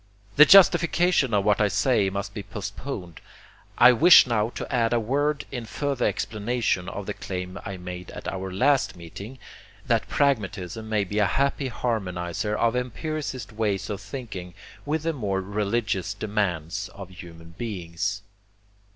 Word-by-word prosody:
The 150 - +9
justification 175 -6 +5
of 100 -2 +1
what 105 0 +3
I 105 - +4
say 105 -2 +2
must 100 +1 -4
be 105 - -5
postponed. 100 - -7 0.6
I 120 +1 +8
wish 160 +9 +8
now 115 -3 0
to - - -5
add 115 -2 +2
a 120 - +3
word 145 +6 0
in 120 -4 -5
further 140 +2 -1
explanation 110 -4 -1
of - - -6
the - - -3
claim 90 +1 -6
I 100 -1 -5
made 90 0 -8
at - - -8
our 95 0 -4
last 130 +7 +2
meeting, 100 +9 -9 0.5
that - - +1
pragmatism 110 - -1
may 105 -2 +1
be 105 +2 -2
a 105 - +4
happy 140 +4 0
harmonizer 105 -4 -2
of 115 +1 +2
empiricist 130 - -4
ways 105 -3 -1
of 100 -1 -5
thinking, 100 -5 -7 0.3
with 155 +1 -1
the 165 0 0
more 100 -8 -2
religious 100 0 -1
demands 100 -3 -2
of 95 -2 -9
human 85 -3 -12
beings. 100 -1 -3
105 Hz, 150 wpm, -25 LUFS, 95-125 Hz, 0.6 s, The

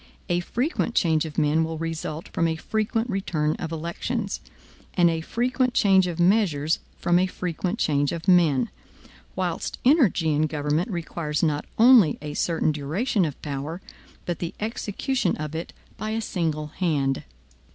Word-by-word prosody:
A 175 0 +2
frequent 235 - -1
change 160 -3 +3
of 155 - -8
men 155 +1 +3
will 160 0 -3
result 165 -1 -4
from 165 - +1
a 160 - 0
frequent 220 +6 -1
return 170 -8 -1
of 165 -2 -5
elections; 180 +7 -3 0.5
and 175 -2 +5
a 165 -1 -2
frequent 250 +6 0
change 190 -2 +5
of 175 -1 -4
measures 175 -5 +3 0.2
from 175 0 +3
a 185 - +2
frequent 180 +2 -3
change 145 - +1
of 170 +1 -5
men: 160 -9 +4 0.6
whilst 180 -3 -2
energy 240 - +4
in 155 +1 +2
government 150 +5 -1
requires 165 -4 -3
not 150 -2 +1
only 225 - +7
a 150 0 -6
certain 160 0 +1
duration 175 - 0
of 150 - -5
power, 145 +4 -4 0.5
but 175 -2 -3
the 170 - -4
execution 220 0 -1
of 155 0 -5
it 165 +1 -5 0.3
by 215 +2 -3
a 220 +1 -1
single 160 -7 -2
hand. 150 -4 0
170 Hz, 155 wpm, -25 LUFS, 155-195 Hz, 0.6 s, only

